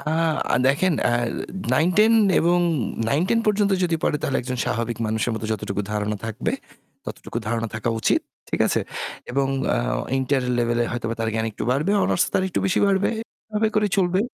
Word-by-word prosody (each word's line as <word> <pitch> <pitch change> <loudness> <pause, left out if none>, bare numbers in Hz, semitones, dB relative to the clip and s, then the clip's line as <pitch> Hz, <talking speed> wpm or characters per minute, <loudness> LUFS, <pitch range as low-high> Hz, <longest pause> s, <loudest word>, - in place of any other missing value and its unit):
অ্যা 160 0 0
দেখেন, 150 +7 +3
অ্যা 120 - +3 0.6
9-10 205 +7 +4 0.3
এবং 175 +1 +3 0.5
9-10 180 - +2
পর্যন্ত 205 -1 +2
যদি 170 -2 +1
পড়ে 150 - +2
তাহলে 135 - 0
একজন 125 0 -4
স্বাভাবিক 115 -1 -2
মানুষের 110 +2 0
মতো 110 - -5
যতটুকু 100 -1 -3
ধারণা 105 0 -1
থাকবে, 110 - -2 0.5
ততটুকু - - -5
ধারণা 115 0 -1
থাকা 110 +2 -1
উচিত। - - +3 0.3
ঠিক - - -2
আছে? - - +1 0.5
এবং 135 +2 +1 0.2
অ্যা - - +2 0.4
ইন্টার 135 0 +1 0.2
লেভেলে 120 0 +1
হয়তো 120 -1 -3
তার 115 - 0
জ্ঞান 110 0 0
একটু - - -7
বাড়বে; 150 +10 +1
অনার্স - - +2
তার - - +3
একটু 180 - -2
বেশি 185 - +1
বাড়বে 195 0 +2 0.4
এভাবে 215 0 +1
করে 210 -1 +3
চলবে। 185 -1 +2
140 Hz, 165 wpm, -23 LUFS, 115-185 Hz, 0.6 s, 9-10